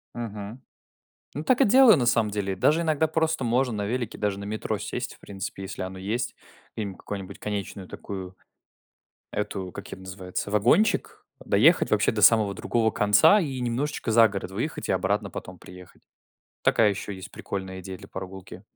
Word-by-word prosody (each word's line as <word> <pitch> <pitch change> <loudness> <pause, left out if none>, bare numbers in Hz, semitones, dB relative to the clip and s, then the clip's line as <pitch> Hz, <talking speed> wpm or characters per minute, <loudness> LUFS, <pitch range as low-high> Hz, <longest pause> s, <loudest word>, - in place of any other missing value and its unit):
Мгм. 110 0 -6 0.7
Ну, 150 - -3
так 255 - +3
и - - +7
делаю 240 -2 +7
на 125 - +1
самом 115 -3 +2
деле. 100 -2 -2
Даже 155 - +3
иногда 160 -1 +2
просто 160 -2 0
можно 120 +1 +1
на 105 -1 -2
велике, 120 0 -3
даже 100 -2 -1
на 100 - -6
метро 110 +1 -3
сесть, - - -5
в - - -24
принципе, 95 0 -7
если 95 - -6
оно 95 0 -5
есть. 110 +6 -2 0.4
Где-нибудь 100 -4 -4
какое-нибудь 95 -3 -7
конечную 100 -2 -5
такую 95 -2 -7 1.0
эту 95 -3 -3
как - - -8
это - - -8
ее 95 - -14
называется, 95 +1 -5
вагончик, 120 - +2 0.2
доехать - - +4
вообще 105 0 +3
до 110 - -2
самого 110 -3 +6
другого 115 +2 +1
конца 105 - +5
и 135 -8 -3
немножечко 125 +1 -2
за 115 0 +7
город 100 -2 -5
выехать 120 +11 -4
и - - +4
обратно 100 +2 0
потом 90 0 -8
приехать. 90 -1 -14 0.6
Такая 110 -2 +4
еще 100 0 -5
есть 95 +2 -9
прикольная 95 -1 -6
идея 95 0 -7
для - - -14
прогулки. 95 0 -8
105 Hz, 175 wpm, -26 LUFS, 95-120 Hz, 1.0 s, и